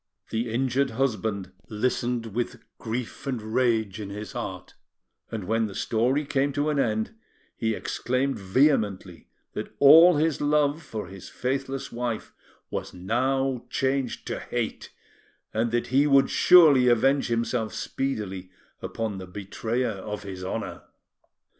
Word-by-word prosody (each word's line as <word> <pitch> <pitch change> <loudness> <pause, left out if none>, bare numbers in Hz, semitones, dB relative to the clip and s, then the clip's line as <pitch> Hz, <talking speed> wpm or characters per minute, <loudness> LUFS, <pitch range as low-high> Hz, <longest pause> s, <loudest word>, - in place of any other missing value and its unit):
The 115 +1 -1
injured 130 +3 +1
husband 110 -6 -1 0.2
listened 120 0 -1
with 120 +1 -3 0.2
grief 115 +4 -5
and 130 -3 -1
rage 110 -2 0
in 100 - -6
his 105 +1 -6
heart, - - -6 0.6
and 110 -3 -4
when 110 +3 +1
the 100 - -9
story 125 +6 +1
came 140 0 +1
to 145 +2 0
an 145 - 0
end, 110 - 0 0.4
he 110 -1 -1
exclaimed 130 +2 -1
vehemently 100 - +1 0.3
that - - -6
all 160 +5 +8
his 155 0 +1
love 145 +1 +2
for 110 -9 -6
his 95 +1 -10
faithless 135 +1 -3
wife 120 -2 -4 0.4
was - - -4
now 130 +6 0
changed 135 -1 -1
to - - -3
hate, - - -4 0.6
and 115 +2 +1
that 120 +1 -1
he 140 +3 +5
would 140 -1 +4
surely 150 -8 +7
avenge 135 +4 +3
himself 115 -1 -1
speedily 100 -9 -3 0.3
upon 110 -4 -3
the 95 - -8
betrayer 110 +6 -2
of 105 +1 -6
his 95 -2 -7
honour. 95 - -4
120 Hz, 135 wpm, -26 LUFS, 110-135 Hz, 0.6 s, all